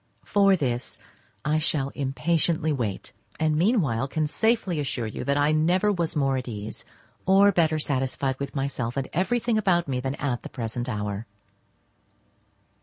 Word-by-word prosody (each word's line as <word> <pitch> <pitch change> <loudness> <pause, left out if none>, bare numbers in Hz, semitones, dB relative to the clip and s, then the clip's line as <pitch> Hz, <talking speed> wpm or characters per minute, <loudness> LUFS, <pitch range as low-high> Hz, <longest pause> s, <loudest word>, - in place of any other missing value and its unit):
For 195 -1 +4
this 125 -7 -2 0.5
I 155 +1 +2
shall 150 -3 0
impatiently 155 +3 0
wait, 115 -8 -3 0.3
and 155 -1 +2
meanwhile 155 - +2
can 155 +2 -1
safely 200 0 +1
assure 135 -4 -2
you 110 - -5
that 140 0 +1
I 145 +1 +3
never 175 +7 +3
was 170 -5 -1
more 135 -2 +2
at 130 - -5
ease, 105 -2 -6 0.4
or 195 +2 +6
better 160 -4 +2
satisfied 135 -2 -1
with 140 +1 -5
myself 135 -3 -2
and 135 - -1
everything 235 +4 +1
about 175 -5 +2
me 130 -2 -1
than 135 +2 -2
at 130 -5 -2
the - - -8
present 120 0 -4
hour. 105 0 -3
145 Hz, 155 wpm, -26 LUFS, 130-170 Hz, 0.5 s, or